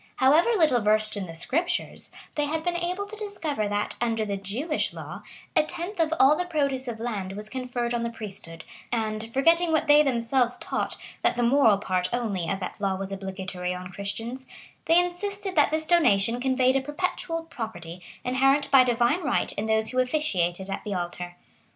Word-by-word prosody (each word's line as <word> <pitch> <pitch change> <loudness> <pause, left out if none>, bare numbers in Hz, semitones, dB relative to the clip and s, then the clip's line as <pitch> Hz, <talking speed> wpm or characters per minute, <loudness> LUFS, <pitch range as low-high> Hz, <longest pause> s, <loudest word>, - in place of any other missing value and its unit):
However 300 - +4
little 300 -9 +4
versed 215 +1 +3
in 195 -2 -4
the 165 - -9
Scriptures, 270 - -1 0.2
they 295 - 0
had 315 +2 -2
been 350 0 0
able 360 +3 -2
to 420 +2 -9
discover 340 - -3
that, 205 0 -2
under 225 -2 0
the 200 -1 -2
Jewish 225 - -2
law, - - -8 0.3
a - - +7
tenth 350 +5 -6
of 320 -1 +2
all 275 +3 +7
the 360 - -1
produce 280 -6 -1
of 230 -2 -4
land 205 -5 -3
was 210 +2 -7
conferred 245 -2 -2
on 240 - 0
the 235 - -1
priesthood; 195 -7 -7 0.3
and, 220 -1 -2
forgetting 330 +6 +3
what 315 - +2
they 295 0 +7
themselves 245 -2 +2
taught, - - -2 0.2
that - - +2
the 240 - 0
moral 235 -4 +5
part 185 -2 -1
only 210 -8 -2
of 195 - -1
that 185 - -6
law 195 -2 +1
was 195 +1 -5
obligatory 190 -2 -4
on 180 0 -8
Christians, 225 +7 -5 0.4
they 330 +1 +5
insisted 380 +3 -1
that 295 - +5
this 315 +1 -1
donation 240 - +3
conveyed 260 0 +3
a - - 0
perpetual 330 +3 -3
property, 185 - -7 0.2
inherent 270 +3 +2
by 270 -2 +8
divine 245 +7 +2
right 275 -7 0
in 215 - -3
those 220 0 +1
who 255 - 0
officiated 195 - 0
at 195 - -4
the 205 -2 -3
altar. 175 0 -4
245 Hz, 190 wpm, -26 LUFS, 205-305 Hz, 0.4 s, by